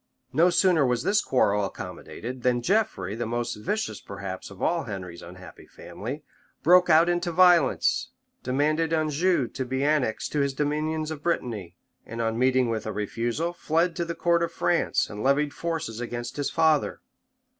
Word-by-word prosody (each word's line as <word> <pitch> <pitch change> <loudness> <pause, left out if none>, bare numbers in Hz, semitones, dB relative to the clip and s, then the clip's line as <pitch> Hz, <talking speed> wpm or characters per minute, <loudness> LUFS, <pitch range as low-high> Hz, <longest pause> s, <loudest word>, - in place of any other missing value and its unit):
No 170 +3 +5
sooner 180 -4 +3
was 125 -1 +1
this 205 +1 +3
quarrel 105 -5 +2
accommodated, 120 +5 -7
than 120 -1 +1
Geoffrey, 180 - 0
the 115 +1 -3
most 120 +1 -2
vicious 210 - -3
perhaps 95 -1 -7
of 100 - -13
all 170 -1 0
Henry's 90 -5 -7
unhappy 90 +1 -12
family, 135 +8 -8 0.4
broke 180 +2 +6
out 165 +1 +6
into 175 0 0
violence; 175 -4 +4 0.3
demanded 155 +5 0
Anjou 155 -1 +1
to 135 - -4
be 130 +2 -2
annexed 145 -7 0
to 150 - -1
his 140 -1 0
dominions 155 +2 -1
of 150 -2 -6
Brittany; 115 - -2 0.3
and 115 - -8
on 115 0 -1
meeting 130 0 +3
with 110 -1 -3
a - - -2
refusal, 115 - -2
fled 165 +1 0
to 170 - -1
the 170 0 -4
court 170 -1 +2
of 170 0 -1
France, 170 0 +1
and 105 0 -7
levied 140 +3 +2
forces 165 -9 -4
against 120 0 -5
his 145 -1 -1
father. 160 -2 +2
140 Hz, 165 wpm, -26 LUFS, 115-165 Hz, 0.4 s, broke